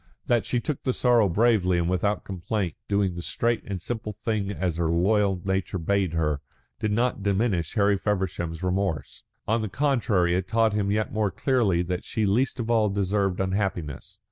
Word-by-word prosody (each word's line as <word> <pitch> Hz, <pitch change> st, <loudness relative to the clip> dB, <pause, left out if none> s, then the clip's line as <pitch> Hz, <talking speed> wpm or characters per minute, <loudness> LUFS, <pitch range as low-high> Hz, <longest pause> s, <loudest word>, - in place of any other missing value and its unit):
That 120 Hz, -2 st, +2 dB
she 125 Hz, -, 0 dB
took 145 Hz, +3 st, -3 dB
the 130 Hz, -, 0 dB
sorrow 120 Hz, -6 st, +3 dB
bravely 100 Hz, -2 st, +3 dB
and 85 Hz, -1 st, 0 dB
without 95 Hz, +3 st, 0 dB
complaint, 95 Hz, -1 st, -3 dB, 0.2 s
doing 100 Hz, -2 st, +1 dB
the 85 Hz, -, -6 dB
straight 115 Hz, +6 st, 0 dB
and 100 Hz, -2 st, -3 dB
simple 110 Hz, +3 st, -4 dB
thing 105 Hz, -2 st, -2 dB
as 90 Hz, -5 st, -2 dB
her 85 Hz, -2 st, 0 dB
loyal 95 Hz, +3 st, +2 dB
nature 95 Hz, 0 st, -1 dB
bade 95 Hz, 0 st, 0 dB
her, 75 Hz, -3 st, 0 dB, 0.4 s
did 105 Hz, -, -1 dB
not 120 Hz, +1 st, 0 dB
diminish 100 Hz, -3 st, 0 dB
Harry 100 Hz, -2 st, +3 dB
Feversham's 90 Hz, -5 st, -2 dB
remorse. 90 Hz, -6 st, -2 dB, 0.3 s
On 115 Hz, +1 st, +2 dB
the 110 Hz, -, -3 dB
contrary 110 Hz, -9 st, +1 dB
it 90 Hz, +1 st, -1 dB
taught 115 Hz, -1 st, +2 dB
him 105 Hz, -1 st, 0 dB
yet 105 Hz, +1 st, 0 dB
more 105 Hz, -1 st, +1 dB
clearly 100 Hz, -4 st, +1 dB
that 90 Hz, 0 st, -3 dB
she 110 Hz, -, -1 dB
least 125 Hz, +7 st, +1 dB
of 120 Hz, 0 st, -1 dB
all 110 Hz, -2 st, +3 dB
deserved 100 Hz, -1 st, 0 dB
unhappiness. 95 Hz, -6 st, -2 dB
100 Hz, 180 wpm, -26 LUFS, 90-110 Hz, 0.4 s, sorrow